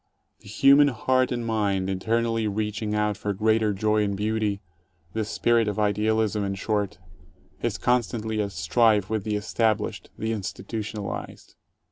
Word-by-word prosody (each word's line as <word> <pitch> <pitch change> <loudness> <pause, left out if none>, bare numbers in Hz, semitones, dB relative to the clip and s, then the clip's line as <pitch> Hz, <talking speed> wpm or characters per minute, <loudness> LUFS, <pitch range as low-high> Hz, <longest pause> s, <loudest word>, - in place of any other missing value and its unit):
The - - -17
human 140 +7 +6
heart 130 0 +1
and 120 -1 -2
mind, 100 -4 0
eternally 115 +3 0
reaching 105 +1 -2
out 105 -1 0
for 105 -1 -2
greater 110 +1 +2
joy 105 +2 +1
and 100 -1 -1
beauty 105 -1 -1 0.3
— 85 -2 -38
the 110 - -1
spirit 115 +1 +1
of 105 - -2
idealism, 105 0 +1
in 100 0 -2
short 105 0 -2 0.3
— - - -32
is - - -1
con 125 0 +3
stantly 110 -1 -3
at 100 - -4
strife 105 +5 +2
with 110 -3 -1
the 105 -1 -1
established, 110 0 -1
the 110 +1 -2
institutionalized. 105 0 -5
105 Hz, 155 wpm, -25 LUFS, 100-110 Hz, 0.3 s, human